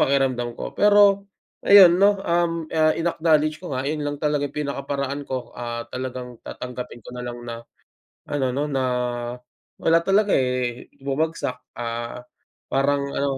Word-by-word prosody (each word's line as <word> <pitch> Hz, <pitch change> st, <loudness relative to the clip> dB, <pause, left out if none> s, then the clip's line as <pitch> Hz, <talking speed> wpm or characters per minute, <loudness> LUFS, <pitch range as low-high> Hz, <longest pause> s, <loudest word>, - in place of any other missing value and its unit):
pakiramdam 130 Hz, -3 st, +1 dB
ko. -, -, -5 dB
Pero 205 Hz, -1 st, +5 dB, 0.4 s
ayun, 190 Hz, -4 st, +9 dB
'no, 200 Hz, 0 st, +5 dB
um, 170 Hz, -2 st, 0 dB
ah, 155 Hz, 0 st, +4 dB
in-acknowledge 160 Hz, -1 st, +1 dB
ko 175 Hz, -, -6 dB
nga, 130 Hz, +1 st, -2 dB
yun 150 Hz, +1 st, -2 dB
lang 145 Hz, 0 st, -3 dB
talaga 150 Hz, -1 st, 0 dB
pinakaparaan 140 Hz, -1 st, -3 dB
ko. 130 Hz, -2 st, -5 dB
Ah, 120 Hz, -1 st, -4 dB
talagang 125 Hz, -1 st, -6 dB
tatanggapin 125 Hz, -1 st, -7 dB
ko -, -, -8 dB
na 125 Hz, -, -5 dB
lang 120 Hz, 0 st, -5 dB
na 115 Hz, 0 st, -6 dB, 0.7 s
ano, 140 Hz, -2 st, 0 dB
'no, 145 Hz, +2 st, 0 dB
na, 135 Hz, -2 st, 0 dB
ah, 125 Hz, -1 st, -2 dB, 0.5 s
wala 165 Hz, +1 st, +4 dB
talaga 200 Hz, +1 st, +3 dB
eh, 125 Hz, -1 st, -1 dB, 0.2 s
bumagsak, 140 Hz, -1 st, -1 dB, 0.2 s
ah, 120 Hz, +1 st, -4 dB, 0.5 s
parang 140 Hz, +1 st, +2 dB
ano 140 Hz, -1 st, 0 dB
140 Hz, 150 wpm, -23 LUFS, 125-160 Hz, 0.7 s, ayun